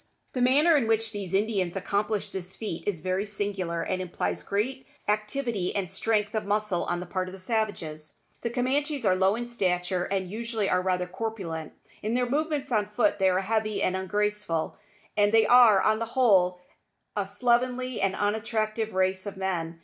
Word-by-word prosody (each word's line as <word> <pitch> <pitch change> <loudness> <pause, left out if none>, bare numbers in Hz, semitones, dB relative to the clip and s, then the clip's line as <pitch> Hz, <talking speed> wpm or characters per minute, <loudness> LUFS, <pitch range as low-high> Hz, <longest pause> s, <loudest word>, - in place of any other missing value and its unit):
The 250 - -1
manner 290 +7 +5
in 260 -6 +2
which 225 0 +1
these 200 -4 -5
Indians 195 -4 0
accomplish 205 +2 -1
this 190 0 -5
feat 210 -7 -5
is 185 -6 -1
very 185 +3 0
singular, 195 -5 -2
and 185 - -2
implies 180 -2 -2
great 255 +7 -2 0.2
activity 215 -1 -1
and 190 -4 -2
strength 210 -1 0
of 220 - -1
muscle 205 -3 0
on 175 - -1
the 180 - -5
part 185 +1 -2
of 185 - -8
the - - -8
savages. 185 -7 -2 0.2
The 235 - -1
Camanchees 270 +2 0
are 185 - +4
low 190 +2 +3
in 240 +1 -4
stature, 180 -5 0
and 190 -2 -1
usually 220 +1 -2
are 180 - +2
rather 180 -1 0
corpulent. 180 -5 -5 0.3
In 220 +3 -1
their 250 0 +1
movements 295 +1 -1
on 210 -3 +2
foot 210 -1 +1
they 190 0 +4
are 185 +1 +2
heavy 215 +1 0
and 185 - +1
ungraceful, 205 -3 -1 0.4
and 205 0 +4
they 225 -1 +5
are, 240 -5 +7
on 215 +2 +2
the 230 - -1
whole, 185 -7 +4 0.5
a 205 - +1
slovenly 245 +4 0
and 195 0 +1
unattractive 215 0 -1
race 190 +1 +1
of 200 - -6
men. 170 -4 -2
205 Hz, 180 wpm, -27 LUFS, 185-225 Hz, 0.5 s, are